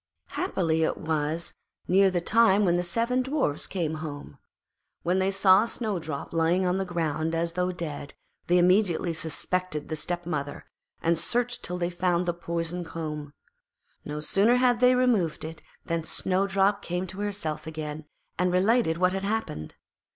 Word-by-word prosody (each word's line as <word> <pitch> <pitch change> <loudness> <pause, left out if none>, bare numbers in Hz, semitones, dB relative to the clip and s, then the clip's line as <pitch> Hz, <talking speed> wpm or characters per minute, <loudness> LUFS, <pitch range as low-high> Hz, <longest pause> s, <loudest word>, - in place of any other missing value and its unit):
Happily 165 - 0
it 160 - +1
was 155 +1 -2 0.3
near 195 +2 +5
the 180 -2 -1
time 210 +1 +4
when 175 - +3
the 175 - +2
seven 230 +8 +1
Dwarfs 265 - 0
came 160 -4 -2
home. 145 -2 -7 0.6
When 180 +2 +1
they 190 +1 +2
saw 195 +1 +5
Snowdrop 175 - -3
lying 170 +3 +2
on 180 +1 +1
the 195 - -1
ground 165 -2 -1
as 165 +1 0
though 180 +1 0
dead, 155 -5 -6 0.3
they 175 - +4
immediately 180 -1 +3
suspected 160 0 -2
her 160 - -3
stepmother, 155 -3 -3 0.4
and 165 0 +2
searched 245 +7 0
till 180 - -3
they 175 0 -1
found 180 0 +1
the 175 - 0
poisoned 170 0 -4
comb. 150 -3 -5 0.7
No 150 0 -5
sooner 200 +10 +3
had 250 -1 +3
they 250 0 +5
removed 225 -13 +1
it 160 0 -8 0.2
than 165 -1 -1
Snowdrop 195 +3 +1
came 180 0 -3
to 190 +2 -8
herself 200 -7 -3
again 155 -1 -5 0.3
and 180 0 +2
related 190 -1 +3
what 180 +1 +2
had 195 0 -3
happened. 200 - -3
175 Hz, 160 wpm, -27 LUFS, 160-195 Hz, 0.7 s, near